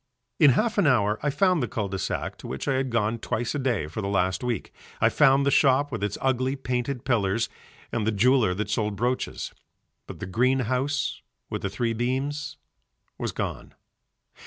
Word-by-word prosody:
In 145 -4 +7
half 220 -1 +1
an 170 - +4
hour 105 -5 +3
I 145 - +1
found 180 +3 +2
the 120 - 0
cul 105 -3 -2
de 95 0 -4
sac - - -3
to - - -8
which 65 - -5
I 140 - +2
had 130 0 0
gone 115 -1 0
twice 120 +1 -2
a 145 - -2
day 125 - 0
for 85 +8 -5
the 100 - -3
last 95 +1 0
week, 120 -2 -3 0.3
I - - +4
found 140 -1 +4
the 140 - +3
shop 140 +1 +4
with 115 -5 -4
the 105 0 -1
ugly 130 0 +1
painted 125 -1 -3
pillars 115 -3 +1 0.4
and 110 -2 -1
the - - +3
jeweller 115 -2 +3
that 105 +1 -3
sold 105 -1 0
brooches, 120 +5 -2 0.5
but - - -9
the - - -4
green 130 +7 +2
house 135 +4 -1 0.3
with - - -3
the 100 - -2
three 115 +4 -1
beams 130 +5 -2 0.6
was - - -2
gone. - - -5
125 Hz, 195 wpm, -26 LUFS, 105-135 Hz, 0.6 s, In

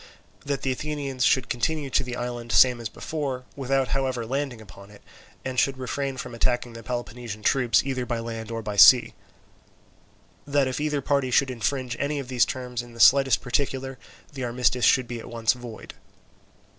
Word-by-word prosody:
That 140 -1 -3
the 135 - +1
Athenians 140 -2 -3
should 130 -1 +3
continue 140 +3 -2
to 140 - +2
the 125 -1 -5
island 120 -1 -5
same 125 -2 +5
as 115 - -4
before, 135 -1 -4
without 135 -1 0
however 130 -3 -1
landing 135 0 -3
upon 100 -2 -14
it, 105 -1 -17 0.4
and 130 -1 -1
should 135 0 +1
refrain 135 +1 -3
from 125 - -6
attacking 120 0 -1
the 115 - -9
Peloponnesian 120 -2 -6
troops 125 -4 +3
either 130 -2 -2
by 120 -1 -1
land 115 -1 -6
or 115 -1 -4
by 105 -1 -5
sea. 125 +4 +8 1.3
That 140 -1 +2
if 130 +2 -3
either 150 -2 0
party 140 -1 0
should 130 +1 +3
infringe 125 +1 -2
any 145 +1 -1
of 135 -3 -5
these 125 -2 +3
terms 125 -2 -4
in 120 -1 -13
the - - -12
slightest 135 +2 +6
particular, 135 +1 -2 0.3
the 135 -2 -5
armistice 125 0 +1
should 130 -2 +4
be 120 0 -5
at - - -10
once 115 -1 +1
void. 120 -3 -10
125 Hz, 180 wpm, -25 LUFS, 120-135 Hz, 1.3 s, sea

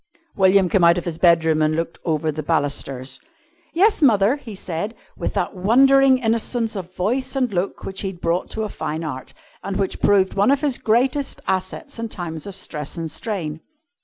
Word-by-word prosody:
William 190 -1 +4
came 180 0 +2
out 170 +1 +6
of 175 - -3
his 165 -2 -4
bedroom 160 -3 +4
and 155 0 +2
looked 165 +1 -3
over 155 -1 0
the 155 +1 -4
balusters. 140 -4 -2 0.6
"Yes, 400 +2 +3
mother," 225 -1 +4
he 230 -7 -9
said, 190 +4 -4 0.2
with - - -4
that - - -1
wondering 265 +7 +5
innocence 230 -1 -1
of 185 -2 -6
voice 255 +8 -1
and 255 -5 0
look 185 +2 -2
which 190 0 -3
he 195 - -2
had 190 -2 -7
brought 170 +1 -1
to 220 - -3
a - - -1
fine 160 -3 -4
art, 130 -5 -6 0.3
and 195 -1 -4
which 195 -1 -2
proved 195 -2 +3
one 200 +3 +3
of 280 0 +3
his 285 -5 0
greatest 260 +5 +1
assets 190 - -3
in 230 0 -3
times 170 -4 -6
of 200 - -7
stress 150 -6 -6
and 165 -2 -3
strain. 160 -5 -3
190 Hz, 190 wpm, -21 LUFS, 165-230 Hz, 0.6 s, out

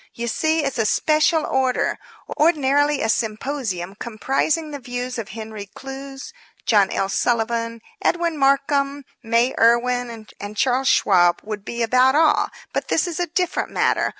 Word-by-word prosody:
You 235 0 -4
see, 315 +7 +1
it's 275 -3 -2
a 220 - +2
special 310 +3 +2
order. 260 -1 0 0.4
Ordinarily 290 -2 +3
a - - +1
symposium 220 -5 -2
comprising 270 +9 -1
the 285 - -6
views 245 0 -5
of 220 - -6
Henry 215 -1 -7
Clews, 270 - -8 0.3
John 205 -4 +4
L. 195 - -1
Sullivan, 230 +2 -1 0.2
Edwin 340 -1 +1
Markham, 275 0 +1 0.2
May 235 +2 +1
Irwin 235 -1 +2
and 205 +1 -7
Charles 265 0 +1
Schwab 175 -3 +4
would 210 -1 -6
be 235 +1 -3
about 255 +3 +4
all. 315 0 +4 0.3
But - - -2
this 315 - +1
is 345 -1 -4
a 350 - 0
different 360 +2 -1
matter. - - +1
250 Hz, 150 wpm, -21 LUFS, 225-285 Hz, 0.4 s, John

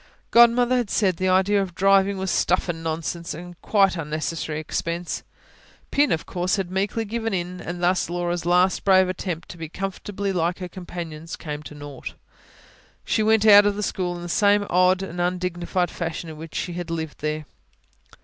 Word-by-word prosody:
Godmother 235 +1 +6
had 240 -5 -1
said 190 -5 +1
the 185 0 0
idea 190 +2 +3
of 185 -3 -5
driving 195 0 +4
was 190 -1 -2
stuff 180 +2 +1
and 165 -2 -4
nonsense 165 +1 -3
a 175 +2 -9
quite 195 -3 +3
unnecessary 155 0 -3
expense. 170 +2 -3 0.7
Pin, 290 +1 +3
of 160 - 0
course, 180 0 -1
had 190 -3 -3
meekly 200 +4 -1
given 225 -1 -2
in; 180 0 -4
and 175 +1 -5
thus 180 -1 +2
Laura's 175 0 -2
last 180 +2 +3
brave 190 -1 +5
attempt 180 -2 -4
to - - -9
be 160 -2 -6
comfortably 195 +2 -4
like 175 0 0
her 180 - -5
companions 170 -3 -7
came 150 -2 -6
to 150 - -10
naught. 145 -2 -8 0.9
She - - +1
went 220 0 +3
out 205 -1 +9
of 205 - +1
the 210 - -3
school 180 -2 -2
in 175 - -7
the - - -5
same 205 +2 +3
odd 185 +1 +4
and 175 -2 -4
undignified 180 0 -1
fashion 165 -1 -4
in 155 - -10
which 160 0 -10
she 175 - -2
had 175 0 -5
lived 160 -2 -4
there. 155 0 -3
180 Hz, 185 wpm, -24 LUFS, 170-195 Hz, 0.9 s, out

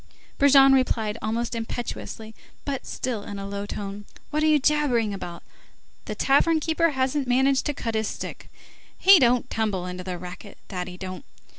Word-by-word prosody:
Brujon 275 -1 +7
replied 230 -5 +1
almost 230 +3 -2
impetuously 225 - -5 0.3
but 275 -2 -4
still 245 -5 -3
in 205 0 -7
a 195 0 -5
low 200 0 -5
tone:— 205 0 -6 0.3
"What 305 +1 0
are 310 - +3
you 305 -1 +5
jabbering 265 -7 +1
about? 175 -3 -7 0.6
The - - -5
tavern 315 +4 +3
keeper 325 +2 +1
hasn't 265 0 -1
managed 265 +2 +2
to 295 - -1
cut 230 -4 -3
his 220 -1 0
stick. - - -7 0.5
He 385 -1 +8
don't 245 -1 +3
tumble 210 -5 -1
to 180 - -7
the 180 -1 -4
racket, 180 +3 -10
that 180 -2 -4
he 180 0 -9
don't! 185 -1 -7
230 Hz, 170 wpm, -25 LUFS, 200-275 Hz, 0.6 s, He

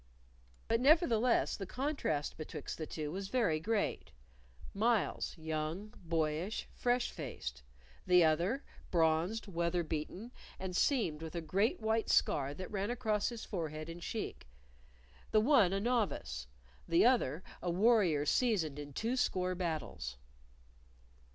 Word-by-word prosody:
But 230 +1 +2
nevertheless 255 -5 +4
the 195 - -6
contrast 255 - -1
betwixt 155 -1 -6
the 155 - -3
two 150 -2 -4
was 190 +3 -4
very 200 -9 +1
great 215 +5 -1 0.6
Myles, 220 -2 +1
young, 160 +6 -3
boyish, 165 +4 -1
fresh 245 0 +1
faced; 65 - -6 0.5
the 180 -1 +7
other, 175 - +2 0.3
bronzed, 165 +5 +2
weather 170 -2 0
beaten, 165 +9 -4 0.3
and 185 -1 -5
seamed 180 - +1
with 160 +1 -6
a - - 0
great 200 - +1
white 220 +1 +1
scar 140 0 +2
that 185 +2 -7
ran 200 0 -1
across 220 -4 0
his 235 -2 -7
forehead 155 -4 -4
and 170 +1 -8
cheek; 210 - -5 0.8
the 215 - +4
one 225 -6 +5
a 195 - +1
novice, 195 - -1 0.4
the 170 +4 +4
other 185 - +3 0.2
a 180 - -2
warrior 180 -6 +3
seasoned 170 - +1
in 145 -1 -7
twoscore 200 - 0
battles. 155 - -3
180 Hz, 130 wpm, -34 LUFS, 155-225 Hz, 0.8 s, the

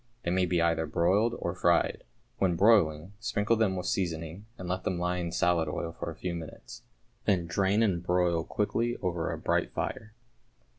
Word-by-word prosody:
They 85 - -1
may 90 0 +2
be 85 -1 +1
either 80 -1 +1
broiled 95 +9 +2
or 85 - -3
fried. 85 -2 +2 0.4
When 90 -3 +2
broiling, 90 -4 +3
sprinkle 110 0 +1
them 110 -4 +1
with 90 -1 -4
seasoning, 85 +2 -3
and 90 - -7
let 90 +1 -2
them 90 - -1
lie 90 +1 -1
in 85 -1 -3
salad 85 -2 +2
oil 85 +2 -3
for 85 - -6
a 80 - -7
few 90 +1 -4
minutes, 85 +8 -8 0.4
then 95 -5 +2
drain 95 +6 +2
and 95 -6 +1
broil 90 -2 +1
quickly 115 +6 -1
over 85 -3 -1
a - - -3
bright - - 0
fire. 110 0 -4
90 Hz, 185 wpm, -29 LUFS, 85-100 Hz, 0.4 s, broiling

